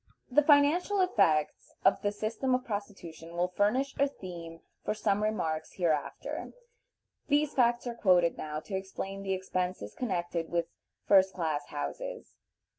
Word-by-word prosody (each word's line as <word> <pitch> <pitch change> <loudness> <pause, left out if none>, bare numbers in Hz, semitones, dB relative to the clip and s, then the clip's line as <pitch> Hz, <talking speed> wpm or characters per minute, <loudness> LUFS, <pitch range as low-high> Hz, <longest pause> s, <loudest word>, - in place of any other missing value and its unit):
The 295 - +6
financial 305 +7 +4
effects 165 - +2
of 195 - +4
the 205 - +1
system 225 +5 -1
of 255 0 -3
prostitution 190 -6 -6
will 180 +1 +1
furnish 250 +7 +2
a 280 - +5
theme 170 -9 -9 0.2
for 210 - -1
some 205 -1 +1
remarks 160 -8 -1
hereafter. 160 -5 -2 0.7
These 295 0 +2
facts 240 -1 +2
are 240 - -3
quoted 180 -7 +3
now 155 0 -5
to 200 - -10
explain 195 +1 -4
the 195 -1 -1
expenses 180 - -3
connected 175 -7 -2
with 170 -1 0 0.4
first 190 -1 +5
class 155 -5 -2
houses. - - -5
195 Hz, 140 wpm, -30 LUFS, 170-245 Hz, 0.7 s, The